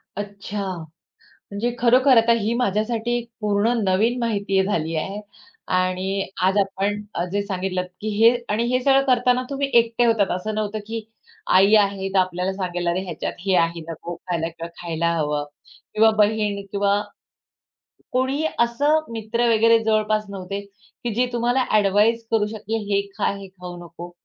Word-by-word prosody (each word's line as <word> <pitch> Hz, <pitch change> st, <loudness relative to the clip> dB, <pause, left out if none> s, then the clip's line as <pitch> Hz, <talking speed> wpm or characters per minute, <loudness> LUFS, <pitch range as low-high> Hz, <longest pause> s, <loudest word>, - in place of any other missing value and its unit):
अच्छा, 205 Hz, 0 st, -5 dB, 0.9 s
म्हणजे 230 Hz, +4 st, -2 dB
खरोखर 255 Hz, +2 st, +5 dB
आता 230 Hz, +1 st, +5 dB
ही 220 Hz, +1 st, -1 dB
माझ्यासाठी 235 Hz, +1 st, 0 dB
एक 235 Hz, 0 st, -8 dB
पूर्ण 210 Hz, +2 st, +1 dB
नवीन 215 Hz, +6 st, +2 dB
माहिती 200 Hz, -4 st, +1 dB
झाली 165 Hz, -5 st, -1 dB
आहे 195 Hz, +6 st, -3 dB, 0.5 s
आणि 185 Hz, +2 st, 0 dB, 0.2 s
आज 190 Hz, +2 st, +3 dB
आपण 200 Hz, +1 st, 0 dB, 0.3 s
जे 205 Hz, 0 st, 0 dB
सांगितलंत, 185 Hz, -2 st, -3 dB
की 215 Hz, -, -3 dB
हे 230 Hz, +2 st, +6 dB, 0.2 s
आणि 225 Hz, +3 st, +1 dB
हे 255 Hz, -, +2 dB
सगळं 270 Hz, +1 st, +4 dB
करताना 250 Hz, -1 st, +3 dB
तुम्ही 280 Hz, 0 st, -1 dB
एकटे 230 Hz, +1 st, +2 dB
होतात 220 Hz, -4 st, +2 dB
असं 215 Hz, +4 st, -4 dB
नव्हतं, 215 Hz, 0 st, -2 dB
की 225 Hz, 0 st, -5 dB, 0.5 s
आई 195 Hz, +3 st, +6 dB
आहे 200 Hz, -2 st, +2 dB
तर -, -, +4 dB
आपल्याला 185 Hz, 0 st, 0 dB
सांगेल 180 Hz, -2 st, -3 dB
"अरे! 175 Hz, +2 st, 0 dB
ह्याच्यात 185 Hz, -, -4 dB
हे 190 Hz, -, +3 dB
आहे 170 Hz, 0 st, +1 dB
नको 165 Hz, +1 st, -6 dB
खायला 170 Hz, -2 st, -3 dB
किंवा 165 Hz, 0 st, -8 dB
खायला 170 Hz, -1 st, -1 dB
हवं." 150 Hz, -2 st, -1 dB, 0.5 s
किंवा 220 Hz, +1 st, +5 dB
बहीण 210 Hz, -1 st, +2 dB
किंवा 200 Hz, 0 st, +2 dB, 1.1 s
कोणीही 265 Hz, +4 st, 0 dB
असं 280 Hz, +7 st, +3 dB
मित्र 230 Hz, +2 st, -1 dB
वगैरे 230 Hz, 0 st, +5 dB
जवळपास 215 Hz, -1 st, +1 dB
नव्हते, 195 Hz, 0 st, -5 dB
की 205 Hz, +3 st, -9 dB
जे 250 Hz, +2 st, +3 dB
तुम्हाला 240 Hz, +2 st, +1 dB
ॲडव्हाइस 215 Hz, +3 st, +3 dB
करू 220 Hz, -2 st, +3 dB
शकतील 220 Hz, +1 st, -4 dB
हे 200 Hz, 0 st, +3 dB, 0.2 s
खा -, -, +1 dB
हे 195 Hz, -1 st, -9 dB
खाऊ 180 Hz, -1 st, -10 dB
नको 175 Hz, +1 st, -10 dB
205 Hz, 155 wpm, -22 LUFS, 190-230 Hz, 1.1 s, हे